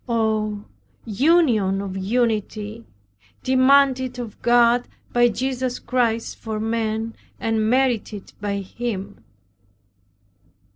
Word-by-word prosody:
Oh, 215 Hz, -2 st, 0 dB, 0.4 s
union 225 Hz, -, +3 dB
of 195 Hz, -1 st, -5 dB
unity, 215 Hz, +1 st, -2 dB, 0.6 s
demanded 260 Hz, -1 st, +3 dB
of 235 Hz, -4 st, -7 dB
God 240 Hz, 0 st, +4 dB, 0.3 s
by 240 Hz, 0 st, +5 dB
Jesus 255 Hz, +2 st, -2 dB
Chirst 230 Hz, -3 st, -1 dB
for 220 Hz, -1 st, -5 dB
men 225 Hz, 0 st, -2 dB, 0.3 s
and 220 Hz, -1 st, 0 dB
merited 240 Hz, -5 st, 0 dB
by 200 Hz, -1 st, -2 dB
him! 200 Hz, -1 st, -5 dB
230 Hz, 90 wpm, -22 LUFS, 215-250 Hz, 0.6 s, by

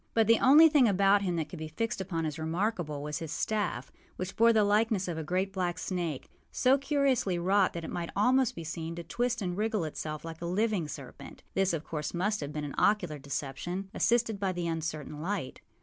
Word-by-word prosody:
But 225 Hz, -1 st, +5 dB
the 230 Hz, +1 st, +5 dB
only 295 Hz, +5 st, +8 dB
thing 295 Hz, -6 st, +5 dB
about 200 Hz, 0 st, +4 dB
him 180 Hz, -3 st, -1 dB
that 160 Hz, -3 st, -2 dB
could 175 Hz, -, -8 dB
be 155 Hz, -, -5 dB
fixed 195 Hz, +6 st, -3 dB
upon 170 Hz, -4 st, -2 dB
as 155 Hz, 0 st, -4 dB
remarkable 160 Hz, -3 st, -2 dB
was 150 Hz, 0 st, -3 dB
his 160 Hz, -2 st, -6 dB
staff, 180 Hz, -, -2 dB, 0.2 s
which 185 Hz, +1 st, -5 dB
bore 230 Hz, +1 st, +6 dB
the 220 Hz, -2 st, +4 dB
likeness 210 Hz, -1 st, +2 dB
of 175 Hz, -, -3 dB
a 160 Hz, -, -4 dB
great 185 Hz, +5 st, -1 dB
black 180 Hz, -2 st, -1 dB
snake, 170 Hz, -5 st, -3 dB, 0.2 s
so 265 Hz, +2 st, +3 dB
curiously 275 Hz, -9 st, +1 dB
wrought 190 Hz, +2 st, +2 dB
that 170 Hz, -, -5 dB
it -, -, -6 dB
might 170 Hz, -1 st, -3 dB
almost 250 Hz, +4 st, +3 dB
be 165 Hz, -, -6 dB
seen 160 Hz, +1 st, -5 dB
to 170 Hz, -, -6 dB
twist 240 Hz, +5 st, -1 dB
and 180 Hz, -1 st, -2 dB
wriggle 215 Hz, -1 st, 0 dB
itself 155 Hz, 0 st, -5 dB
like 165 Hz, 0 st, -8 dB
a 170 Hz, -, -3 dB
living 200 Hz, -2 st, 0 dB
serpent. 150 Hz, -, -10 dB
This, 195 Hz, -1 st, +2 dB
of 165 Hz, -2 st, -2 dB
course, 150 Hz, +1 st, -4 dB
must 205 Hz, +5 st, 0 dB
have 145 Hz, -1 st, -5 dB
been 150 Hz, 0 st, -4 dB
an 145 Hz, -, -6 dB
ocular 180 Hz, -8 st, +2 dB
deception, 150 Hz, +7 st, -4 dB
assisted 235 Hz, -4 st, +1 dB
by 195 Hz, -2 st, 0 dB
the 175 Hz, -1 st, -3 dB
uncertain 155 Hz, -2 st, -4 dB
light. 185 Hz, -5 st, -3 dB
180 Hz, 215 wpm, -30 LUFS, 160-215 Hz, 0.2 s, only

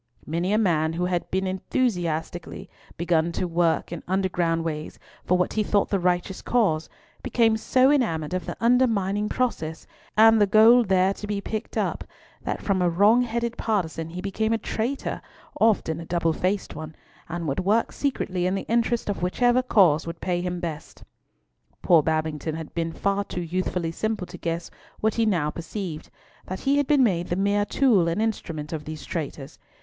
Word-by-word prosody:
Many 170 Hz, +4 st, -1 dB
a 210 Hz, -, +3 dB
man 165 Hz, -7 st, +2 dB
who 175 Hz, +2 st, -1 dB
had 180 Hz, -1 st, -2 dB
begun 190 Hz, +1 st, -1 dB
enthusiastically 175 Hz, -5 st, -2 dB, 0.3 s
to 170 Hz, +1 st, 0 dB
work 170 Hz, -1 st, +1 dB
in 170 Hz, -, -5 dB
underground 175 Hz, -3 st, 0 dB
ways 155 Hz, -2 st, -5 dB, 0.3 s
for 180 Hz, -, +2 dB
what 180 Hz, -, 0 dB
he 215 Hz, -, +1 dB
thought 205 Hz, -1 st, +1 dB
the 200 Hz, -, +1 dB
righteous 180 Hz, +1 st, 0 dB
cause, 195 Hz, -10 st, +1 dB, 0.3 s
became 225 Hz, -2 st, +2 dB
so 255 Hz, +4 st, +3 dB
enamoured 175 Hz, -, 0 dB
of 185 Hz, -3 st, -3 dB
the -, -, -5 dB
undermining 215 Hz, -4 st, +2 dB
process, 165 Hz, -11 st, -2 dB, 0.3 s
and 225 Hz, 0 st, +7 dB
the 205 Hz, -, +5 dB
gold 220 Hz, +2 st, +6 dB
there 190 Hz, 0 st, +3 dB
to 210 Hz, -, -8 dB
be 205 Hz, -1 st, -2 dB
picked 215 Hz, +2 st, -5 dB
up, -, -, -1 dB, 0.4 s
that -, -, -4 dB
from 195 Hz, -3 st, +1 dB
a 175 Hz, -, +3 dB
wrong 205 Hz, +8 st, +4 dB
headed 235 Hz, 0 st, -2 dB
partizan 165 Hz, -7 st, -2 dB
he 180 Hz, +2 st, -6 dB
became 215 Hz, +3 st, -1 dB
a -, -, +2 dB
traitor—often 220 Hz, -, -2 dB
a 165 Hz, -, -7 dB
double 165 Hz, -1 st, 0 dB
faced 190 Hz, +4 st, -1 dB
one—and 160 Hz, +2 st, -8 dB
would 140 Hz, -, -1 dB
work 210 Hz, +5 st, +1 dB
secretly 185 Hz, -10 st, -1 dB
in 185 Hz, -, 0 dB
the 195 Hz, -, -4 dB
interest 235 Hz, 0 st, +1 dB
of 205 Hz, -3 st, -2 dB
whichever 245 Hz, +8 st, +2 dB
cause 180 Hz, -11 st, +3 dB
would 165 Hz, 0 st, -6 dB
pay 175 Hz, -1 st, -1 dB
him 180 Hz, 0 st, -3 dB
best. 165 Hz, -4 st, -7 dB, 0.8 s
Poor 170 Hz, -3 st, +6 dB
Babington 155 Hz, 0 st, -2 dB
had 160 Hz, -2 st, -7 dB
been 165 Hz, -1 st, -2 dB
far 200 Hz, +4 st, 0 dB
too 180 Hz, -, -5 dB
youthfully 175 Hz, 0 st, -2 dB
simple 215 Hz, +2 st, -2 dB
to 180 Hz, 0 st, -10 dB
guess 165 Hz, 0 st, -3 dB, 0.3 s
what 220 Hz, 0 st, +1 dB
he 230 Hz, -1 st, +1 dB
now 165 Hz, -7 st, +1 dB
perceived, 170 Hz, -1 st, -6 dB, 0.4 s
that 185 Hz, -, -5 dB
he 280 Hz, +1 st, +2 dB
had 285 Hz, -2 st, +1 dB
been 290 Hz, -3 st, +4 dB
made 175 Hz, -7 st, +1 dB
the 175 Hz, -, -1 dB
mere 200 Hz, +2 st, +1 dB
tool 225 Hz, -11 st, +3 dB
and 170 Hz, +4 st, -1 dB
instrument 165 Hz, -9 st, -3 dB
of 150 Hz, -2 st, -5 dB
these 155 Hz, 0 st, -7 dB
traitors. 145 Hz, -4 st, -5 dB
185 Hz, 175 wpm, -25 LUFS, 165-220 Hz, 0.8 s, and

